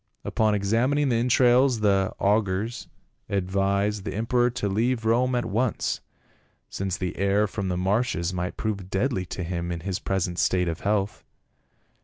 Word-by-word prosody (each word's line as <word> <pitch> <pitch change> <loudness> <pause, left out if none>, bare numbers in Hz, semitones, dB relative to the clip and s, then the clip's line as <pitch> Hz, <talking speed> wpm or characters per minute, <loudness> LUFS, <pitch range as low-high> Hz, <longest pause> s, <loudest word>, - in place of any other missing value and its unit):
Upon 110 -1 +1
examining 120 +8 +1
the 120 - +2
entrails 125 0 +4
the 95 -2 +2
augurs 105 +2 0 0.4
ad 95 -2 -1
vised 100 +1 +1
the - - -4
emperor 120 +3 +2
to 120 -4 -3
leave 115 +4 0
Rome 125 +3 +2
at 120 - 0
once, 115 +3 -1 0.7
since 95 -1 -2
the 90 -3 -3
air 100 +2 +2
from 100 -2 -4
the 90 -1 -1
marshes 95 -2 0
might 90 0 -3
prove 100 -4 -3
deadly 95 -2 -1
to 90 - -5
him 85 0 -3
in 85 -1 -4
his 95 +2 -3
present 90 -2 -2
state 90 -1 +2
of 80 -1 -3
health." 100 0 -1
100 Hz, 160 wpm, -25 LUFS, 95-115 Hz, 0.7 s, entrails